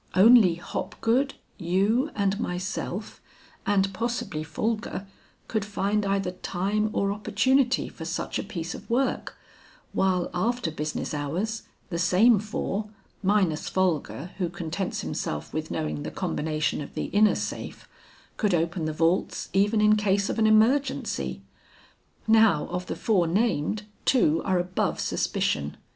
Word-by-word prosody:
Only 205 -2 +7
Hopgood, 240 +9 -1 0.2
you 200 - +2
and 200 0 +1
myself, 190 +1 -4 0.5
and 195 -1 +2
possibly 225 -7 -2
Folger, 215 +4 -3 0.4
could 220 -2 -1
find 205 0 0
either 195 -2 0
time 195 +4 -1
or 200 -1 0
opportunity 260 +5 +2
for 160 - -9
such 170 +2 -3
a - - -2
piece 175 -4 -5
of - - -10
work; 255 +3 0 0.6
while 185 -2 +1
after 225 0 0
business 155 0 -3
hours, 175 +10 -3 0.2
the 170 - -2
same 205 +6 +5
four, 210 0 -3 0.3
minus 190 -5 +1
Folger 175 -2 -1
who 180 -3 0
contents 175 +2 -3
himself 75 0 -4
with 155 0 -3
knowing 75 -1 -2
the - - -4
combination 155 0 -1
of 140 - -9
the - - -2
inner 210 +1 +5
safe, - - -5 0.5
could 205 -5 +2
open 170 0 -1
the 155 - -1
vaults 165 +4 0
even 205 +3 +3
in 210 0 +6
case 200 -1 +1
of - - -3
an 220 - +4
emergency. 215 - +2 0.8
Now 220 -8 +5
of 180 +1 -4
the - - -3
four 190 -7 +2
named, 205 0 0 0.2
two 165 - +3
are 190 -1 +2
above 180 +1 -1
suspicion. 75 0 -1
195 Hz, 135 wpm, -26 LUFS, 170-215 Hz, 0.8 s, Only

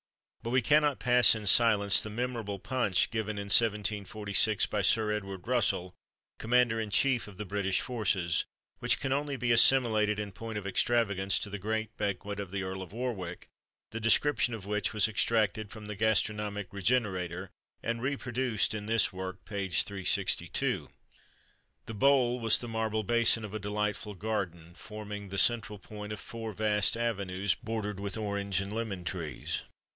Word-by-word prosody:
But 115 - -5
we 125 +1 +2
cannot 150 -2 +3
pass 125 -3 +6
in 110 -1 -6
silence 105 -2 +5
the 110 - -6
memorable 115 -3 -3
punch 105 -3 0
given 110 -2 -3
in 100 - -4
1746 105 -1 +2
by 105 - -2
Sir 105 +3 +3
Edward 95 -3 -5
Russell, 115 -7 0 0.5
Commander 120 -1 +2
in 110 -1 -3
Chief 125 +3 +2
of 100 -2 -12
the 105 - -5
British 95 -1 -1
forces, 95 -8 0 0.3
which - - +1
can 135 -1 -1
only 140 0 -2
be 120 -1 0
assimilated 115 -4 +4
in 105 -1 -4
point 110 +3 -6
of 105 - -6
extravagance 100 -2 +1
to 100 - -3
the 105 - -5
great 110 +2 -3
banquet 100 0 -3
of 100 -2 -5
the 100 0 -3
Earl 95 0 -5
of 90 - -9
Warwick, 105 -7 -5 0.4
the 115 - -4
description 120 +2 +3
of 100 -4 -9
which 105 0 -1
was 110 -2 +2
extracted 110 -1 0
from 110 -1 -10
the 105 0 -6
"Gastronomic 105 -2 0
Regenerator," 95 -4 -1 0.3
and 115 0 -2
reproduced 125 -5 -1
in 105 -1 -5
this 110 -3 +2
work, 95 0 -7
page 100 -4 0
362. 95 -3 -1 1.0
The 115 - -7
bowl 125 +1 +3
was 115 -2 +4
the 120 - -6
marble 110 -1 -1
basin 115 0 +2
of 105 - -9
a 110 - -3
delightful 105 0 -3
garden, 90 -5 -4
forming 105 0 -8
the 100 - -5
central 105 -2 +3
point 105 +1 -9
of 105 - -5
four 115 0 -7
vast 105 +1 +2
avenues, 100 -4 -1
bordered 105 -3 -4
with 100 +2 -2
orange 100 -3 -1
and 100 +1 -4
lemon 110 -5 -4
trees. 85 -6 -4
105 Hz, 165 wpm, -30 LUFS, 100-115 Hz, 1.0 s, pass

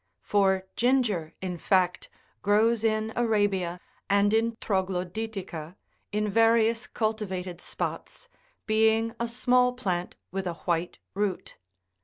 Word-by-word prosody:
For 190 -2 +2
ginger, 230 -10 +1
in 180 -2 -3
fact, 180 -1 +1 0.3
grows 220 +2 +3
in 220 0 0
Arabia 205 -6 +1 0.3
and. 200 +1 +3
in 230 +1 +2
Troglodytica, 190 -3 -3 0.4
in 210 0 0
various 230 +2 +3
cultivated 190 -5 -3
spots, - - -5 0.4
being 220 +1 +3
a 235 - 0
small 250 +1 +2
plant50 180 -7 -2 0.2
with 190 0 -3
a 175 - -2
white 175 0 -2 0.2
root. 200 -2 -2
210 Hz, 110 wpm, -27 LUFS, 185-225 Hz, 0.4 s, grows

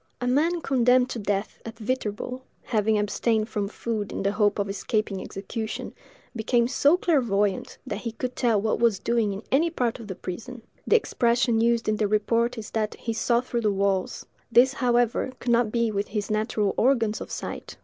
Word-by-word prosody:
A 245 - -3
man 320 +7 +2
condemned 255 -1 +3
to 235 - -4
death 200 0 -2
at 225 0 -8
Viterbo, 250 +1 -3 0.2
having 215 -2 +1
abstained 215 +2 0
from 205 -2 -2
food 215 0 -4
in - - -3
the 200 - +2
hope 205 -1 +2
of 200 -1 -1
escaping 200 0 -2
execution, 220 +4 -5 0.4
became 235 +1 +2
so 285 +6 +4
clairvoyant, 210 - +1
that 205 - -4
he 230 +1 -4
could 250 +2 -4
tell 230 -5 +2
what 215 +2 0
was 230 -4 +3
doing 230 0 0
in 200 +2 -6
any 315 +5 +3
part 250 -7 -1
of 225 - -9
the 190 - -5
prison; 225 +8 -7 0.2
the - - +5
expression 240 - +2
used 235 0 +2
in 215 0 +1
the 210 - +1
report 230 +3 +1
is 220 -1 -7
that 215 -1 -1
he 230 - -4
"saw 235 +1 +2
through 240 -1 -3
the 215 -2 +2
walls:" 195 -1 -1 0.3
this, 250 +3 +6
however, 245 0 +1
could 240 - -1
not 235 -2 +3
be 235 -1 +1
with 200 0 -2
his 210 -1 -3
natural 215 -2 0
organs 230 -4 +2
of - - -6
sight. - - -6
225 Hz, 190 wpm, -25 LUFS, 210-245 Hz, 0.4 s, this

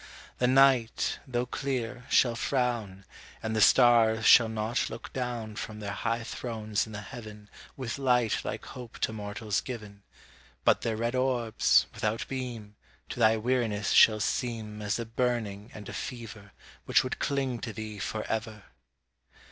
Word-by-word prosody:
The 125 - +3
night, 130 -3 +3
though 125 -1 -1
clear, 125 -1 -4
shall 120 -2 +4
frown, 115 -7 -1 0.4
And 110 0 -2
the 110 - +2
stars 115 -2 +5
shall 115 -2 +7
not 110 +2 -1
look 115 - -9
down 120 -4 -4
From 105 0 -6
their 100 -1 -4
high 115 +3 -2
thrones 110 -3 -3
in - - -10
the 105 - -5
Heaven 105 -3 -10 0.3
With 130 0 -4
light 125 -5 +2
like - - -5
hope 125 -3 -10
to 110 - -1
mortals 105 -1 -3
given, 105 -5 -8 0.6
But - - +4
their 115 -2 -1
red 115 +2 -1
orbs, 125 -3 +3
without 110 +1 -2
beam, 120 -6 -6 0.3
To - - -6
thy 110 -1 +5
weariness 110 -3 0
shall 110 -1 +7
seem 110 -1 -2
As 105 -1 -1
a 115 - -4
burning 115 -3 -2
and 105 -2 -10
a - - -7
fever 110 -5 -7 0.3
Which - - +4
would 130 - -4
cling 135 -4 -1
to 115 - -5
thee 110 0 -7
for 110 +2 -3
ever. 110 -2 -4
115 Hz, 155 wpm, -29 LUFS, 105-125 Hz, 0.6 s, shall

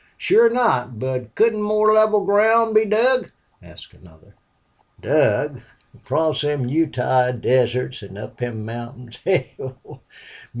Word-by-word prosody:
"Sure 230 +1 +4
not. 130 - 0
But 130 +1 -5
couldn't 220 -1 +2
more 215 +1 +2
level 215 -2 +3
ground 220 +3 +3
be 215 0 +4
dug?" 245 +5 +1 0.3
asked - - -15
another. 80 -3 -21 0.7
"Dug? - - 0 0.3
Across 160 -1 -2
them 145 -3 -2
Utah 130 -4 +1
deserts 125 0 -1
an' 100 -1 -12
up 105 - -10
them 115 -3 -5
mountains? 120 +1 -9
Hell! 130 -7 -4
140 Hz, 120 wpm, -20 LUFS, -, 0.7 s, Sure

